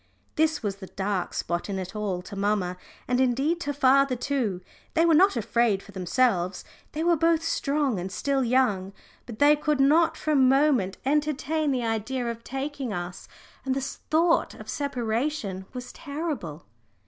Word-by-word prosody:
This 315 Hz, -3 st, +1 dB
was 200 Hz, -2 st, -2 dB
the 190 Hz, -1 st, -9 dB
dark 195 Hz, -2 st, -2 dB
spot 175 Hz, +3 st, -2 dB
in 195 Hz, -, -2 dB
it 185 Hz, +2 st, -6 dB
all 195 Hz, -4 st, -2 dB
to 200 Hz, -, -9 dB
mamma, 200 Hz, -2 st, 0 dB, 0.3 s
and 250 Hz, 0 st, +2 dB
indeed 270 Hz, +7 st, +1 dB
to 290 Hz, -4 st, -2 dB
father 275 Hz, -1 st, +4 dB
too. 240 Hz, -8 st, -1 dB, 0.3 s
They 330 Hz, +1 st, +4 dB
were 335 Hz, -, +5 dB
not 360 Hz, -2 st, +5 dB
afraid 225 Hz, -2 st, +1 dB
for -, -, -14 dB
themselves. 185 Hz, -1 st, 0 dB, 0.3 s
They 315 Hz, -, -2 dB
were 345 Hz, 0 st, +4 dB
both 330 Hz, +1 st, +2 dB
strong 285 Hz, -, 0 dB
and 185 Hz, +2 st, -5 dB
still 275 Hz, +5 st, 0 dB
young, 230 Hz, -6 st, +1 dB, 0.3 s
but 230 Hz, -3 st, -8 dB
they 290 Hz, +3 st, +6 dB
could 300 Hz, -1 st, 0 dB
not 320 Hz, +4 st, +4 dB
for 310 Hz, -, -2 dB
a -, -, +3 dB
moment 265 Hz, -7 st, +3 dB
entertain 300 Hz, +1 st, 0 dB
the 255 Hz, -3 st, 0 dB
idea 230 Hz, +3 st, -2 dB
of 230 Hz, 0 st, -9 dB
taking 270 Hz, -1 st, -4 dB
us. 175 Hz, -2 st, -5 dB, 0.4 s
And 265 Hz, -1 st, -1 dB
the 275 Hz, -, -1 dB
thought 320 Hz, +5 st, +1 dB
of -, -, -11 dB
separation 235 Hz, -6 st, -2 dB
was 250 Hz, -1 st, -8 dB
terrible. 280 Hz, -, -5 dB
260 Hz, 170 wpm, -26 LUFS, 200-295 Hz, 0.4 s, they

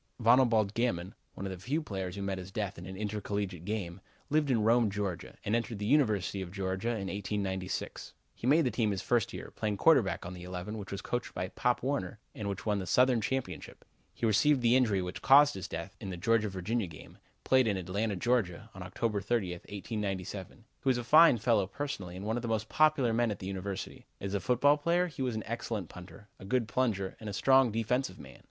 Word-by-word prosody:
Vonalbalde 115 Hz, -3 st, +4 dB
Gammon, 110 Hz, -6 st, -1 dB, 0.2 s
one 95 Hz, -, -5 dB
of 95 Hz, -, -3 dB
the 95 Hz, -, -7 dB
few 135 Hz, -, -1 dB
players 95 Hz, -, -4 dB
who 100 Hz, -, -4 dB
met 95 Hz, -1 st, -2 dB
his 90 Hz, 0 st, -8 dB
death 100 Hz, -4 st, -3 dB
in 90 Hz, -, -8 dB
an 95 Hz, 0 st, -7 dB
intercollegiate 100 Hz, -4 st, -3 dB
game, 95 Hz, -4 st, -4 dB, 0.3 s
lived 150 Hz, -1 st, +2 dB
at 125 Hz, -, +3 dB
Rome, 115 Hz, +1 st, +3 dB
Georgia, 100 Hz, -3 st, -4 dB
and 105 Hz, -, +1 dB
entered 115 Hz, -1 st, -2 dB
the 105 Hz, -, -4 dB
University 105 Hz, -7 st, +2 dB
of 90 Hz, -2 st, -6 dB
Georgia 95 Hz, +2 st, -3 dB
in 110 Hz, -5 st, -2 dB
1896. 95 Hz, -2 st, -3 dB, 0.2 s
He 120 Hz, -, -5 dB
made 155 Hz, +5 st, +5 dB
the 125 Hz, -, +1 dB
team 110 Hz, 0 st, +1 dB
his 95 Hz, -2 st, -2 dB
first 120 Hz, -4 st, +1 dB
year, -, -, -8 dB
playing 105 Hz, -2 st, -1 dB
quarterback 125 Hz, -, +3 dB
on 90 Hz, -, -6 dB
the 90 Hz, -, -9 dB
eleven 90 Hz, +4 st, -5 dB
which 100 Hz, -, -8 dB
was 100 Hz, -, -5 dB
coached 120 Hz, 0 st, -3 dB
by 90 Hz, -, -2 dB
Pop 125 Hz, +3 st, 0 dB
Warner 135 Hz, -3 st, -2 dB, 0.2 s
and 105 Hz, -2 st, -4 dB
which 100 Hz, 0 st, -5 dB
won 105 Hz, -2 st, +1 dB
the 95 Hz, -, -5 dB
Southern 125 Hz, +3 st, +4 dB
championship. 135 Hz, +3 st, -4 dB, 0.3 s
He -, -, -3 dB
received 125 Hz, +6 st, +4 dB
the 120 Hz, +1 st, +5 dB
injury 110 Hz, -8 st, +3 dB
which 90 Hz, -, -6 dB
caused 145 Hz, +2 st, +7 dB
his 95 Hz, -3 st, -5 dB
death 85 Hz, +4 st, -6 dB
in 100 Hz, -, -5 dB
the 90 Hz, -, -5 dB
Georgia 110 Hz, +3 st, +2 dB
Virginia 100 Hz, +3 st, -2 dB
game, 80 Hz, -3 st, -13 dB, 0.2 s
played 130 Hz, -2 st, +4 dB
in 100 Hz, -3 st, +1 dB
Atlanta, 100 Hz, +4 st, -2 dB
Georgia, 110 Hz, -2 st, 0 dB
on 95 Hz, -, -10 dB
October 100 Hz, +3 st, -2 dB
30th, 95 Hz, -7 st, -2 dB
1897. 100 Hz, 0 st, -5 dB, 0.2 s
He 135 Hz, -, +1 dB
was 130 Hz, -, +3 dB
a 120 Hz, -, -3 dB
fine 155 Hz, +1 st, +7 dB
fellow 110 Hz, -3 st, +2 dB
personally 100 Hz, -8 st, -5 dB
and 95 Hz, +2 st, -6 dB
one 110 Hz, +2 st, 0 dB
of -, -, -2 dB
the 120 Hz, -, -4 dB
most 110 Hz, -1 st, -1 dB
popular 155 Hz, -6 st, +3 dB
men 120 Hz, 0 st, +2 dB
at 105 Hz, -, -3 dB
the -, -, -8 dB
University. 95 Hz, 0 st, -5 dB
As 100 Hz, 0 st, -4 dB
a 100 Hz, -, +1 dB
football 125 Hz, +9 st, +3 dB
player, 170 Hz, +4 st, +2 dB
he 150 Hz, -5 st, -7 dB
was 125 Hz, -3 st, -1 dB
an 110 Hz, -, -3 dB
excellent 115 Hz, -5 st, -4 dB
punter, 90 Hz, +5 st, -12 dB
a -, -, -11 dB
good 115 Hz, +3 st, 0 dB
plunger, 110 Hz, -6 st, 0 dB
and 110 Hz, -, -6 dB
a -, -, -5 dB
strong 130 Hz, +2 st, +4 dB
defensive 125 Hz, +4 st, -1 dB
man. -, -, -12 dB
105 Hz, 220 wpm, -31 LUFS, 95-120 Hz, 0.3 s, caused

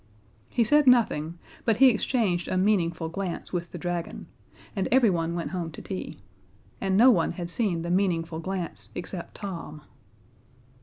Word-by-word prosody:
He 240 Hz, -, +2 dB
said 295 Hz, +5 st, +4 dB
nothing, 175 Hz, -10 st, +3 dB, 0.3 s
but 225 Hz, -3 st, +2 dB
he 265 Hz, +2 st, +8 dB
exchanged 210 Hz, -6 st, 0 dB
a 185 Hz, -, -1 dB
meaningful 175 Hz, -5 st, +1 dB
glance 185 Hz, +2 st, -4 dB
with 170 Hz, -1 st, -3 dB
the -, -, -6 dB
dragon, 175 Hz, 0 st, -4 dB, 0.5 s
and 195 Hz, -, 0 dB
everyone 180 Hz, -10 st, +3 dB
went 165 Hz, -4 st, -3 dB
home 175 Hz, -3 st, -3 dB
to -, -, -9 dB
tea. 190 Hz, -, -6 dB, 0.6 s
And 190 Hz, -1 st, +1 dB
no 250 Hz, +4 st, +8 dB
one -, -, +1 dB
had 175 Hz, -2 st, -5 dB
seen 180 Hz, -6 st, 0 dB
the 170 Hz, -, -2 dB
meaningful 170 Hz, -4 st, 0 dB
glance 180 Hz, 0 st, -5 dB
except 175 Hz, 0 st, -6 dB
Tom. 170 Hz, -6 st, -7 dB
180 Hz, 155 wpm, -27 LUFS, 170-210 Hz, 0.6 s, he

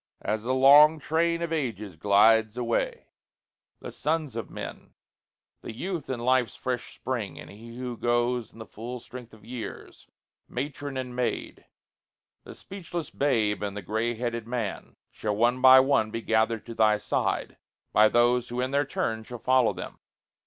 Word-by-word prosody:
As 110 Hz, 0 st, -1 dB
the 125 Hz, +4 st, -1 dB
long 145 Hz, +4 st, +7 dB
train 170 Hz, +3 st, 0 dB
Of 165 Hz, -1 st, -2 dB
ages 110 Hz, -, -3 dB
glides 110 Hz, +5 st, +4 dB
away, 120 Hz, -2 st, -1 dB, 0.8 s
the -, -, -7 dB
sons 155 Hz, -5 st, -2 dB
of 115 Hz, -, -5 dB
men, -, -, -8 dB, 0.7 s
The -, -, -7 dB
youth 175 Hz, +4 st, -4 dB
in 130 Hz, -2 st, -2 dB
life's 125 Hz, 0 st, +1 dB
fresh 125 Hz, -1 st, -4 dB
spring 120 Hz, -6 st, -4 dB
and -, -, -10 dB
he 115 Hz, +3 st, -12 dB
who 125 Hz, -1 st, -4 dB
goes 120 Hz, 0 st, 0 dB
In -, -, -18 dB
the 110 Hz, -, -8 dB
full 120 Hz, +4 st, -7 dB
strength 125 Hz, 0 st, -11 dB
of 110 Hz, -2 st, -17 dB
years, 120 Hz, -4 st, -8 dB, 0.4 s
matron 145 Hz, -1 st, -5 dB
and 125 Hz, -1 st, -5 dB
maid, 125 Hz, -1 st, -3 dB, 0.8 s
The -, -, -10 dB
speechless 175 Hz, -4 st, -7 dB
babe 115 Hz, -8 st, +1 dB
and 100 Hz, -1 st, -4 dB
the 105 Hz, -, -6 dB
gray 110 Hz, +5 st, -1 dB
headed 115 Hz, -1 st, -3 dB
man 120 Hz, -5 st, -4 dB, 0.2 s
Shall 105 Hz, -1 st, -3 dB
one 120 Hz, +4 st, +2 dB
by 130 Hz, 0 st, +9 dB
one 130 Hz, -5 st, +2 dB
be 115 Hz, +1 st, -5 dB
gathered 110 Hz, 0 st, +1 dB
to 115 Hz, -, -7 dB
thy 110 Hz, -1 st, +3 dB
side, -, -, -2 dB, 0.4 s
By 105 Hz, 0 st, +6 dB
those 120 Hz, +1 st, +2 dB
who 120 Hz, +1 st, -4 dB
in 130 Hz, +1 st, -1 dB
their 140 Hz, +1 st, +2 dB
turn 110 Hz, -4 st, -2 dB
shall 120 Hz, +2 st, -8 dB
follow 130 Hz, +1 st, +3 dB
them. -, -, -8 dB
120 Hz, 165 wpm, -27 LUFS, 110-130 Hz, 0.8 s, by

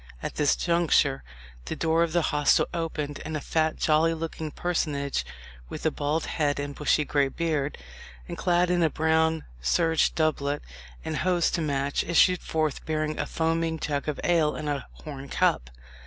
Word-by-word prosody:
At -, -, -3 dB
this 145 Hz, -1 st, +2 dB
juncture 165 Hz, -5 st, +2 dB, 0.4 s
the -, -, -4 dB
door 165 Hz, 0 st, +1 dB
of 170 Hz, -1 st, +1 dB
the 175 Hz, 0 st, +2 dB
hostel 145 Hz, -1 st, +4 dB
opened, 150 Hz, -3 st, -3 dB
and 155 Hz, 0 st, -3 dB
a -, -, -3 dB
fat 160 Hz, +1 st, 0 dB
jolly 160 Hz, +1 st, +2 dB
looking 160 Hz, -1 st, -5 dB
personage, 145 Hz, -, -1 dB, 0.5 s
with -, -, -7 dB
a 160 Hz, -, +3 dB
bald 150 Hz, +3 st, -1 dB
head 145 Hz, -2 st, 0 dB
and 145 Hz, 0 st, -4 dB
bushy 150 Hz, +1 st, +1 dB
grey 140 Hz, -1 st, +2 dB
beard, 150 Hz, -1 st, -2 dB, 0.5 s
and -, -, -5 dB
clad 175 Hz, 0 st, +2 dB
in 175 Hz, -1 st, +2 dB
a 160 Hz, -, +4 dB
brown 160 Hz, 0 st, +1 dB, 0.2 s
serge 160 Hz, -, +2 dB
doublet, 145 Hz, -2 st, 0 dB, 0.4 s
and -, -, -2 dB
hose 175 Hz, -1 st, +2 dB
to 170 Hz, -, -1 dB
match, 140 Hz, -2 st, 0 dB
issued 175 Hz, +1 st, +4 dB
forth, 155 Hz, -2 st, -1 dB
bearing 155 Hz, -1 st, -2 dB
a -, -, -1 dB
foaming 165 Hz, 0 st, 0 dB
jug 145 Hz, -1 st, -2 dB
of 150 Hz, -, -3 dB
ale 165 Hz, -3 st, +2 dB
and 155 Hz, -, -5 dB
a 145 Hz, -1 st, -3 dB
horn 140 Hz, -2 st, -9 dB
cup. -, -, +1 dB
155 Hz, 170 wpm, -26 LUFS, 145-165 Hz, 0.5 s, hostel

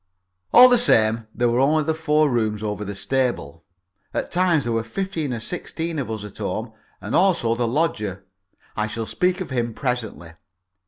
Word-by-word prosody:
All 250 Hz, +1 st, +9 dB
the 245 Hz, -1 st, +4 dB
same, 110 Hz, -, +3 dB
there 120 Hz, +1 st, 0 dB
were 120 Hz, +1 st, +1 dB
only 150 Hz, +3 st, +3 dB
the 160 Hz, -, 0 dB
four 155 Hz, -1 st, +2 dB
rooms 110 Hz, -5 st, -1 dB
over 105 Hz, -1 st, -3 dB
the 100 Hz, 0 st, -6 dB
stable. 110 Hz, -, -2 dB, 0.5 s
At -, -, -2 dB
times 175 Hz, -4 st, +2 dB
there 120 Hz, -, -2 dB
were 115 Hz, 0 st, 0 dB
fifteen 160 Hz, +3 st, -3 dB
or 120 Hz, -, -3 dB
sixteen 165 Hz, +4 st, -4 dB
of 130 Hz, -, -4 dB
us 110 Hz, -2 st, -4 dB
at 105 Hz, 0 st, -10 dB
home, 110 Hz, +3 st, -3 dB, 0.3 s
and -, -, -6 dB
also 175 Hz, -11 st, +3 dB
the 120 Hz, 0 st, -1 dB
lodger 110 Hz, -, -1 dB, 0.5 s
I 110 Hz, 0 st, -1 dB
shall 115 Hz, +1 st, -4 dB
speak 180 Hz, -, 0 dB
of 175 Hz, -, -6 dB
him 120 Hz, -3 st, -2 dB
presently. 115 Hz, -10 st, -4 dB
120 Hz, 180 wpm, -22 LUFS, 110-160 Hz, 0.5 s, All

